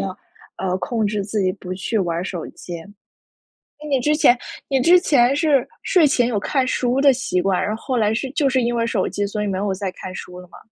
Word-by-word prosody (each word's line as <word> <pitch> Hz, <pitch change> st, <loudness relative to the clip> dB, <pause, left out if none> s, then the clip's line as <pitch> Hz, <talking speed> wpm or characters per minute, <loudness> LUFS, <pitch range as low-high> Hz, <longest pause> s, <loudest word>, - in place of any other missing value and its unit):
要， 190 Hz, -1 st, -4 dB, 0.4 s
呃， 185 Hz, -1 st, -1 dB
控 225 Hz, 0 st, -1 dB
制 205 Hz, -1 st, -1 dB
自 210 Hz, +1 st, -2 dB
己 185 Hz, -, +2 dB
不 185 Hz, -2 st, -7 dB
去 215 Hz, +4 st, -2 dB
玩 170 Hz, -3 st, -1 dB
儿 170 Hz, -, -2 dB
手 180 Hz, -3 st, -5 dB
机。 175 Hz, -, -9 dB, 1.1 s
那 300 Hz, -, -7 dB
你 270 Hz, -2 st, +2 dB
之 300 Hz, +4 st, +2 dB
前 245 Hz, -5 st, +5 dB, 0.3 s
你 270 Hz, -2 st, +2 dB
之 350 Hz, +6 st, +6 dB
前 275 Hz, -6 st, +3 dB
是 290 Hz, -5 st, +2 dB, 0.2 s
睡 355 Hz, -5 st, +4 dB
前 245 Hz, -3 st, +2 dB
有 225 Hz, -4 st, 0 dB
看 265 Hz, +5 st, 0 dB
书 255 Hz, +1 st, 0 dB
的 280 Hz, -1 st, +7 dB
习 240 Hz, -8 st, -1 dB
惯， 190 Hz, -1 st, +1 dB
然 215 Hz, -, -1 dB
后 225 Hz, -, -12 dB
后 260 Hz, -3 st, -2 dB
来 215 Hz, -1 st, +2 dB
是 260 Hz, +4 st, -2 dB
就 285 Hz, -1 st, +1 dB
是 260 Hz, -1 st, +2 dB
因 240 Hz, 0 st, 0 dB
为 230 Hz, -1 st, +1 dB
手 220 Hz, -5 st, 0 dB
机， 205 Hz, -, -2 dB
所 210 Hz, +1 st, -3 dB
以 -, -, -2 dB
没 190 Hz, -, -2 dB
有 195 Hz, 0 st, -1 dB
再 190 Hz, -1 st, -3 dB
看 185 Hz, -, -8 dB
书 180 Hz, 0 st, -8 dB
了 180 Hz, -, -12 dB
吗？ -, -, -14 dB
225 Hz, 270 characters per minute, -21 LUFS, 190-265 Hz, 1.1 s, 的